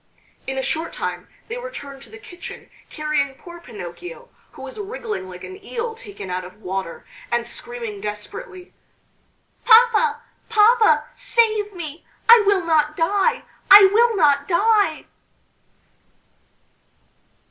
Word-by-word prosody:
In 265 0 -3
a 265 - -1
short 320 +4 -2
time - - -5 0.2
they 470 +2 -5
returned 280 - -9
to - - -13
the 440 - -12
kitchen 360 -4 -11 0.2
carrying 300 -3 -2
poor 345 +4 -12
Pinocchio, 340 - -10 0.2
who - - -11
was - - -9
wriggling 420 - -5
like 180 -1 -11
an 380 +1 -10
eel 460 +1 -4
taken 415 - -10
out 180 0 -3
of 185 +3 -13
water, 190 -3 -5 0.3
and 240 0 0
screaming 235 -4 -6
desperately, 355 - -8 0.9
"Papa! 465 -1 +5 0.3
papa! 435 -8 +4
save 440 -4 +1
me! 315 -2 -8 0.2
I 460 -1 +8
will 390 -4 +2
not 305 -2 +1
die, 395 +7 +1 0.3
I 400 -1 +10
will 465 +1 +4
not 285 -5 +3
die!" 415 +4 +2
355 Hz, 125 wpm, -21 LUFS, 270-445 Hz, 0.9 s, I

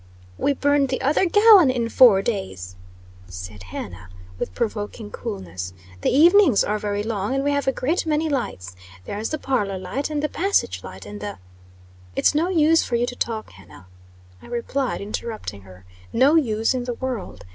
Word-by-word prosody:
"We 285 - +1
burned 285 0 +2
the 260 - -1
other 300 +7 +3
gallon 415 -4 +7
in 240 -3 0
four 230 -5 +6
days," 95 - -4 0.5
said 90 +2 -9
Hannah, 95 0 -8 0.3
with 90 - -4
provoking 210 0 -4
coolness. 90 -1 -6 0.3
"The - - +1
evenings 340 - +5
are 210 +1 -1
very 205 0 -2
long, 215 +2 -2
and 270 - 0
we 285 - +1
have 285 -1 -1
a - - +4
great 315 +7 -1
many 310 +1 +1
lights. 95 - -3 0.3
There's 215 +2 -4
the 310 - -2
parlor 210 -9 -1
light, 185 +12 -4
and 300 -1 -2
the - - +2
passage 390 +6 0
light, - - -10
and 205 0 -9
the 205 -1 -5 0.4
" 90 0 -25
"It's - - +3
no 320 +4 +1
use 325 -2 +4
for 240 - -2
you 235 +1 +2
to 245 - -6
talk, 225 -3 -3
Hannah," 95 -1 -16 0.6
I - - -14
replied, 245 +3 -2
interrupting 210 - -5
her. 90 -1 -16 0.3
"No 265 +5 +4
use 225 -7 +2
in 250 -1 -3
the 245 -1 -3
world. 245 - -5
230 Hz, 180 wpm, -23 LUFS, 180-285 Hz, 0.6 s, gallon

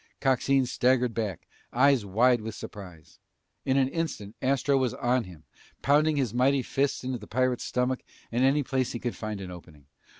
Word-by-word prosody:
Coxine 135 0 +2
staggered 125 -1 +2
back, 110 -4 -4 0.2
eyes 135 -1 +4
wide 120 +4 +3
with 110 0 -6
surprise. 85 -7 -11 0.5
In 135 0 +2
an 135 -1 +3
instant 135 -11 -4
Astro 135 +1 +2
was 130 -3 +1
on 125 -1 +1
him, 85 -4 -13 0.4
pounding 150 +2 +3
his 130 -6 0
mighty 130 +2 +2
fists 135 +1 -1
into 130 -1 -3
the - - -11
pirate's 130 0 0
stomach 125 +1 0 0.3
and 120 +2 +1
any 140 +2 +3
place 130 -1 -1
he 120 - -4
could 120 0 -3
find 110 -2 -5
an 90 -1 -7
opening. 80 -5 -13
125 Hz, 175 wpm, -27 LUFS, 110-135 Hz, 0.5 s, eyes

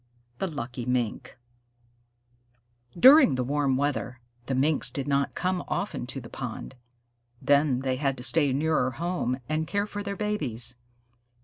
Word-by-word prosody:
THE 195 - -1
LUCKY 125 -6 -6
MINK 125 -1 -2 1.6
During 265 - +8
the 130 - -1
warm 140 0 0
weather, 130 -3 -2 0.3
the 135 - -1
Minks 145 +3 +2
did 140 0 -3
not 140 -1 0
come 180 0 -1
often 185 -9 -3
to 135 - -5
the 120 - -10
pond. 125 +1 -7 0.7
Then 140 -1 +2
they 130 -1 -1
had 135 -1 -1
to 125 - -8
stay 140 +3 +3
nearer 145 -1 +1
home 140 -2 -2
and 155 +1 -1
care 200 +4 0
for 205 0 -6
their 200 0 -4
babies. 130 - -1
140 Hz, 145 wpm, -27 LUFS, 130-160 Hz, 1.6 s, During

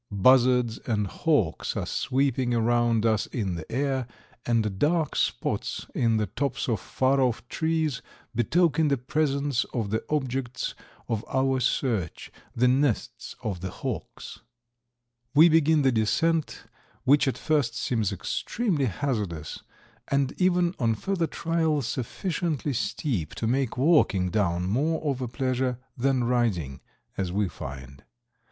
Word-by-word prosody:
Buzzards 125 +2 +4
and 105 -3 +1
hawks 110 - 0
are - - -1
sweeping 130 -2 0
around 115 -1 +2
us 110 -2 +2
in 100 -7 -2
the 85 -2 -7
air, 130 -1 -1 0.4
and 110 -5 0
dark 160 +2 +1
spots - - -1
in 115 -2 +2
the 105 - +1
tops 130 +7 -2
of 115 -5 0
far 135 +6 +1
off 125 -1 0
trees 160 -5 0 0.3
betoken 160 +6 +2
the 140 -1 +2
presence 140 0 0
of 110 -4 -1
the 110 - -1
objects 130 -4 -2 0.3
of 110 -1 -2
our 130 0 +1
search, 115 - -1 0.2
the 125 +2 +3
nests 130 -2 0
of 95 -5 -3
the 95 - -3
hawks. - - -6 1.0
We 160 +4 +8
begin 160 -1 +4
the 135 - +4
descent, 155 +8 0 0.4
which 140 +2 +4
at 135 - 0
first 145 -7 0
seems 110 -6 0
extremely 155 - -1
hazardous, 100 - -3 0.5
and 140 -1 +1
even 180 -1 +3
on 115 -3 +2
further 170 - -1
trial 160 -4 0
sufficiently 150 - -2
steep 110 - -2
to - - -3
make 130 +1 0
walking 125 - +3
down 90 -4 0
more 145 +11 +1
of 140 -4 -1
a 125 - -2
pleasure 130 0 -1 0.2
than 130 0 +1
riding, 110 - 0 0.4
as 95 -2 -1
we 100 +1 +1
find. 65 -3 -9
125 Hz, 135 wpm, -26 LUFS, 110-145 Hz, 1.0 s, We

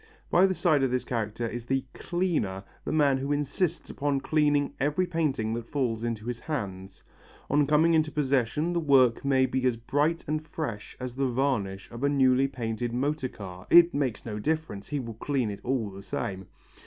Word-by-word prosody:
By 185 +3 +6
the 190 - -1
side 155 -6 +3
of 135 - +2
this 125 0 0
character 115 -1 -2
is 120 +1 -6
the 135 0 0
"cleaner," 165 - -1 0.2
the - - -2
man 145 -4 +3
who 140 +2 -2
insists 155 +4 -1
upon 145 -1 -1
cleaning 145 -1 +2
every 150 +7 +1
painting 150 -11 -1
that 115 0 -4
falls 120 -6 -1
into 115 -2 -3
his 120 -1 -3
hands. 95 -10 -5 0.5
On 145 0 +3
coming 155 +3 +4
into 155 -1 +3
his - - -18
possession 140 +3 +1
the 170 - +1
work 135 -6 +4
may 135 -1 +3
be 130 0 -1
as 120 -2 +1
bright 145 +8 0
and 155 +1 -1
fresh 145 -9 -6
as 125 -1 -5
the 135 +1 0
varnish 120 -7 -1
of 120 +3 -7
a 140 - +3
newly 135 -1 +4
painted 120 -2 -3
motor 135 +1 -1
car, 95 -4 -10
it 170 0 +7
makes 135 -5 -1
no 105 -2 -4
difference, 155 -6 -2
he 145 -1 -2
will 115 -3 -5
clean 125 -1 -1
it 100 - -7
all 120 -5 -1
the 95 +1 -9
same. 95 -1 -4
135 Hz, 195 wpm, -28 LUFS, 115-150 Hz, 0.5 s, it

